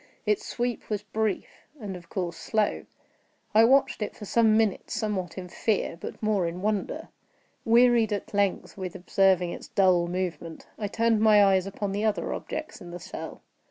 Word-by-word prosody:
Its 210 Hz, -1 st, +1 dB
sweep 240 Hz, 0 st, -3 dB
was 210 Hz, -1 st, -2 dB
brief, 215 Hz, -1 st, -3 dB
and 200 Hz, -4 st, -5 dB
of 175 Hz, -1 st, -12 dB
course 175 Hz, -3 st, -3 dB
slow. 215 Hz, +3 st, -1 dB, 0.7 s
I 220 Hz, +1 st, +7 dB
watched 265 Hz, 0 st, +3 dB
it 210 Hz, -, -3 dB
for 210 Hz, -, -9 dB
some 220 Hz, +1 st, +4 dB
minutes, 220 Hz, -3 st, 0 dB
somewhat 205 Hz, -6 st, -2 dB
in 185 Hz, -1 st, -5 dB
fear, 200 Hz, +1 st, -1 dB
but 170 Hz, -, -9 dB
more 205 Hz, -5 st, +1 dB
in 175 Hz, +3 st, -5 dB
wonder. 210 Hz, -1 st, -2 dB, 0.6 s
Wearied 235 Hz, -1 st, +5 dB
at 205 Hz, 0 st, -4 dB
length 200 Hz, -2 st, 0 dB
with 185 Hz, -2 st, -5 dB
observing 185 Hz, -1 st, +2 dB
its -, -, -8 dB
dull 180 Hz, -3 st, +3 dB
movement, 170 Hz, -3 st, -4 dB
I 210 Hz, -, -1 dB
turned 225 Hz, +1 st, +2 dB
my 210 Hz, -2 st, +6 dB
eyes 190 Hz, -1 st, +3 dB
upon 200 Hz, 0 st, -3 dB
the 205 Hz, +2 st, -2 dB
other 215 Hz, -1 st, 0 dB
objects 310 Hz, -, -6 dB
in 175 Hz, -, -9 dB
the 175 Hz, +1 st, -7 dB
cell. -, -, -8 dB
205 Hz, 175 wpm, -27 LUFS, 185-220 Hz, 0.7 s, I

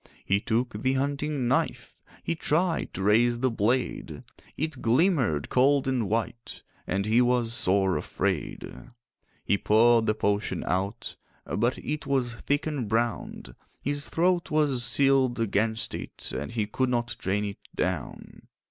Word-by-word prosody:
He 100 Hz, +1 st, +2 dB
took 115 Hz, -1 st, -1 dB
the 130 Hz, 0 st, +2 dB
hunting 140 Hz, 0 st, -1 dB
knife, 130 Hz, -, -1 dB, 0.3 s
He -, -, -1 dB
tried 165 Hz, +1 st, 0 dB
to 95 Hz, -, -3 dB
raise 120 Hz, +4 st, +4 dB
the 130 Hz, -1 st, +2 dB
blade; 115 Hz, +4 st, -1 dB, 0.3 s
It 155 Hz, -3 st, -3 dB
glimmered 120 Hz, -, +2 dB
cold 135 Hz, +2 st, +3 dB
and 125 Hz, -7 st, 0 dB
white, 115 Hz, +1 st, -3 dB, 0.2 s
And 100 Hz, +1 st, -1 dB
he 110 Hz, +3 st, +4 dB
was 120 Hz, -2 st, +2 dB
sore 95 Hz, -3 st, +2 dB
afraid. -, -, -2 dB, 0.8 s
He 100 Hz, -, +2 dB
poured 115 Hz, +1 st, +4 dB
the 110 Hz, -, +2 dB
potion 100 Hz, 0 st, -1 dB
out, 95 Hz, +5 st, -2 dB, 0.3 s
But 120 Hz, +4 st, 0 dB
it 150 Hz, +1 st, -4 dB
was 130 Hz, -4 st, 0 dB
thick 145 Hz, +6 st, -1 dB
and 145 Hz, -7 st, -2 dB
brown; 115 Hz, -, -2 dB, 0.2 s
His 145 Hz, +1 st, -2 dB
throat 175 Hz, +1 st, +1 dB
was 145 Hz, -5 st, +1 dB
sealed 130 Hz, 0 st, +3 dB
against 110 Hz, 0 st, 0 dB
it, -, -, -6 dB
And 75 Hz, -, -4 dB
he 110 Hz, -3 st, 0 dB
could 130 Hz, +5 st, -1 dB
not 120 Hz, -2 st, -1 dB
drain 105 Hz, +2 st, -1 dB
it 100 Hz, -1 st, -6 dB, 0.2 s
down. -, -, -4 dB
120 Hz, 145 wpm, -27 LUFS, 110-135 Hz, 0.8 s, raise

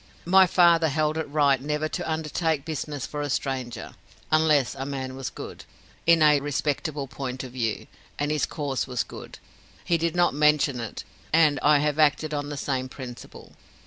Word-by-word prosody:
My 190 Hz, +2 st, +6 dB
father 170 Hz, -2 st, +5 dB
held 155 Hz, +1 st, 0 dB
it 160 Hz, -, -4 dB
right 140 Hz, -3 st, +3 dB
never 150 Hz, +2 st, -1 dB
to 170 Hz, 0 st, -4 dB
undertake 160 Hz, -1 st, -1 dB
business 150 Hz, -3 st, -4 dB
for 150 Hz, -, -5 dB
a 145 Hz, -, -3 dB
stranger 130 Hz, -3 st, -3 dB, 0.4 s
unless 155 Hz, -4 st, +3 dB
a 135 Hz, -, -5 dB
man 135 Hz, -2 st, -5 dB
was 135 Hz, -1 st, -4 dB
good, -, -, -9 dB, 0.4 s
in 165 Hz, -2 st, +6 dB
a 150 Hz, -1 st, +6 dB
respectable 145 Hz, +1 st, -2 dB
point 130 Hz, 0 st, -5 dB
of 130 Hz, -, -8 dB
view, 115 Hz, -4 st, -2 dB, 0.3 s
and 145 Hz, +1 st, -1 dB
his 150 Hz, -, 0 dB
cause 145 Hz, -5 st, -3 dB
was 125 Hz, -2 st, -1 dB
good, -, -, -11 dB, 0.5 s
he 170 Hz, -1 st, +1 dB
did 165 Hz, 0 st, -1 dB
not 175 Hz, 0 st, +3 dB
mention 150 Hz, -3 st, +3 dB
it 115 Hz, -3 st, -6 dB, 0.3 s
and 155 Hz, -3 st, +4 dB
I 150 Hz, 0 st, +5 dB
have 150 Hz, 0 st, 0 dB
acted 155 Hz, 0 st, +2 dB
on 145 Hz, 0 st, -3 dB
the 145 Hz, -, -5 dB
same 130 Hz, -2 st, -2 dB
principle. 125 Hz, -3 st, -10 dB
145 Hz, 175 wpm, -25 LUFS, 135-155 Hz, 0.5 s, My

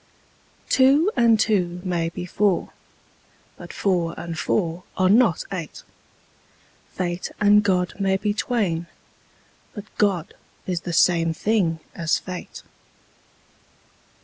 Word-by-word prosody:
Two 280 Hz, +8 st, +4 dB
and 230 Hz, -3 st, +4 dB
two 180 Hz, -5 st, +1 dB
may 170 Hz, -3 st, -1 dB
be 175 Hz, +1 st, -6 dB
four: 190 Hz, 0 st, 0 dB, 0.8 s
but -, -, -10 dB
four 175 Hz, -5 st, -1 dB
and 170 Hz, 0 st, -5 dB
four 170 Hz, +1 st, -1 dB, 0.2 s
are 185 Hz, 0 st, +3 dB
not 220 Hz, -6 st, +4 dB
eight: 170 Hz, -6 st, -6 dB, 1.1 s
Fate 175 Hz, -1 st, -3 dB
and 210 Hz, 0 st, +5 dB
God 185 Hz, -3 st, 0 dB
may 195 Hz, -1 st, +1 dB
be 205 Hz, +1 st, -1 dB
twain: 200 Hz, -7 st, -1 dB, 0.9 s
but 205 Hz, -1 st, -7 dB
God 190 Hz, -6 st, +1 dB, 0.3 s
is 180 Hz, -3 st, -2 dB
the 175 Hz, -, -5 dB
same 165 Hz, -1 st, +3 dB
thing 175 Hz, -6 st, 0 dB
as 165 Hz, -2 st, 0 dB
fate. 185 Hz, -1 st, -8 dB
185 Hz, 115 wpm, -23 LUFS, 170-210 Hz, 1.1 s, and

